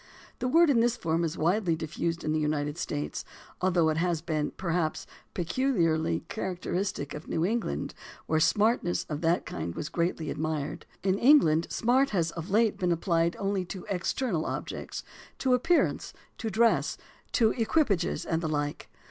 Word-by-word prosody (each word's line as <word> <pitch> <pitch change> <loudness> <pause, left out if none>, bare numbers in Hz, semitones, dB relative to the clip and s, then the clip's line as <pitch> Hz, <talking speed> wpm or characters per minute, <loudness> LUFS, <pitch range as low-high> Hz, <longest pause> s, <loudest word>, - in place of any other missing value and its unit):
The 255 - -1
word 330 +3 +5
in 245 - +4
this 235 +1 +2
form 165 0 0
is 165 -1 -2
widely 175 +1 +2
diffused 165 +1 -3
in 155 - -1
the 155 - +1
United 150 -1 -1
States, 75 +1 -3 0.4
although 175 -3 +3
it 155 - 0
has 170 -1 +1
been, 155 -3 -1
perhaps, 170 -3 -1 0.3
peculiarly 165 - +1
characteristic 185 -6 -3
of 150 - -8
New 160 - 0
England, 230 +4 -2 0.3
where 160 - +1
"smartness" 205 +1 +2
of 150 0 -3
that 170 +1 +2
kind 85 0 -5
was 150 - -4
greatly 170 -2 -1
admired. 155 0 -3 0.2
In 190 +1 +1
England 170 - +5
"smart" 260 +4 +2
has 170 -5 0
of 170 +2 -7
late 215 +2 +2
been 180 -1 +1
applied 170 0 +1
only 195 -1 -1
to 180 +1 -7
external 185 -1 -1
objects, - - -5 0.3
to 260 -1 +2
appearance, 325 +8 +2 0.3
to 225 - -2
dress, 230 +2 +2 0.4
to 220 -2 +4
equipages, 220 - +1
and 165 0 0
the 160 - -2
like. 145 -1 -2
170 Hz, 160 wpm, -28 LUFS, 155-215 Hz, 0.4 s, word